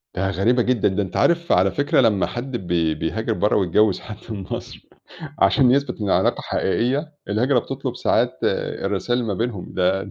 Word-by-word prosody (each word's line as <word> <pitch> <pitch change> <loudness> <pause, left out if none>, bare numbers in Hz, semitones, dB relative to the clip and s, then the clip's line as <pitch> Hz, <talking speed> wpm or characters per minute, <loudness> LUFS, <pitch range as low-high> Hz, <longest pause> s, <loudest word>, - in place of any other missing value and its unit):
ده 95 +1 0
غريبة 105 +7 +2
جدًا، 120 -2 +1
ده 100 +1 0
أنت 95 -2 -6
عارف 170 0 +2
على 95 +2 +4
فكرة 145 +6 +2
لمّا 105 -6 +2
حد 125 +1 -5
بي 85 -5 0
بيهاجر 110 +7 -2
برّا 105 0 +1
ويتجوز 100 +1 +2
حد 105 - -9
من 105 -3 -5
مصر - - -7 0.5
عشان 130 -4 +4
يثبت 135 -2 0
إن 105 - -2
العلاقة 95 - +2
حقيقيّة، 140 +6 -1 0.2
الهجرة 125 +6 +2
بتطلب - - -4
ساعات - - +2
آآ - - -2
الرساايل 105 +5 -1
اللي 115 - -3
ما 95 - -5
بينهم 115 -5 -3
ده 95 +2 0
110 Hz, 185 wpm, -22 LUFS, 95-125 Hz, 0.5 s, على